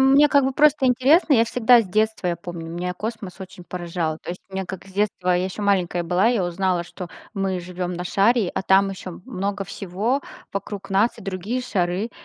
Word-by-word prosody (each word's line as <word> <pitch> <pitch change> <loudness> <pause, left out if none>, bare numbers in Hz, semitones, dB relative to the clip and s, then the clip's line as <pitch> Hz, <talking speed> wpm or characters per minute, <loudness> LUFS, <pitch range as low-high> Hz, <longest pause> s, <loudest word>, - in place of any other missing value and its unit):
мне 275 +2 +6
как 280 -2 +4
бы 270 - 0
просто 295 -1 +4
интересно. 275 +6 +4
Я 230 -1 +5
всегда 245 0 +5
с - - -3
детства 215 -1 0
я 170 - -1
помню. 170 -1 -7
Меня 180 +1 -3
космос 210 -3 -6
очень 190 -1 -10
поражал. 170 -3 -3
То - - -14
есть 180 - -7
мне 190 0 -4
как 190 +1 -8
с 190 - -14
детства, 195 -2 0
я 180 +1 +2
ещё 190 +2 -5
маленькая 180 -3 +1
была, 180 +6 +3
я 230 -7 +1
узнала, 175 0 0
что 180 0 -8 0.3
мы 190 -2 -1
живём 180 0 -4
на 180 - -4
шаре, 200 +3 +3
а - - -1
там 195 +1 +4
ещё 185 -2 -8
много 200 -4 -3
всего 200 +8 -2 0.3
вокруг 200 0 -5
нас 200 +4 +2
и - - -10
другие 195 +6 -3
шары. 195 -2 -1
195 Hz, 205 wpm, -23 LUFS, 180-225 Hz, 0.3 s, мне